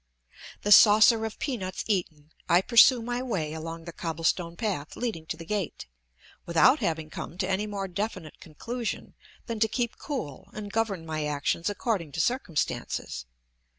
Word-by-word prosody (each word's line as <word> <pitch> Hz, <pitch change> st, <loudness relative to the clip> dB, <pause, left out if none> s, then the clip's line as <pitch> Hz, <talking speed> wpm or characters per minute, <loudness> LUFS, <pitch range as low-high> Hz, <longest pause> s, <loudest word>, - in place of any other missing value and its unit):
The 205 Hz, -, 0 dB
saucer 215 Hz, +2 st, +8 dB
of 220 Hz, -, -10 dB
peanuts 195 Hz, -10 st, -3 dB
eaten, 160 Hz, -7 st, -2 dB, 0.2 s
I 175 Hz, +2 st, +6 dB
pursue 235 Hz, +3 st, +6 dB
my 240 Hz, +1 st, -2 dB
way 185 Hz, -12 st, -2 dB
along 165 Hz, +1 st, -6 dB
the 170 Hz, -, -6 dB
cobblestone 165 Hz, +1 st, -1 dB
path 185 Hz, -9 st, -3 dB
leading 210 Hz, -10 st, -4 dB
to 160 Hz, -, -4 dB
the 165 Hz, -, -9 dB
gate, 200 Hz, 0 st, -3 dB, 0.6 s
without 215 Hz, -, +5 dB
having 160 Hz, -6 st, -2 dB
come 170 Hz, -, -7 dB
to 185 Hz, -1 st, -1 dB
any 195 Hz, +2 st, 0 dB
more 200 Hz, -2 st, -3 dB
definite 185 Hz, -4 st, -5 dB
conclusion 230 Hz, +9 st, -5 dB, 0.3 s
than 230 Hz, -2 st, -4 dB
to 220 Hz, -, +4 dB
keep 235 Hz, +1 st, -2 dB
cool 160 Hz, -, -5 dB
and 205 Hz, -1 st, -7 dB
govern 205 Hz, -7 st, -1 dB
my 155 Hz, -1 st, -3 dB
actions 150 Hz, +4 st, -1 dB
according 200 Hz, -, -2 dB
to -, -, -4 dB
circumstances. 155 Hz, -, -2 dB
190 Hz, 155 wpm, -27 LUFS, 160-225 Hz, 0.6 s, saucer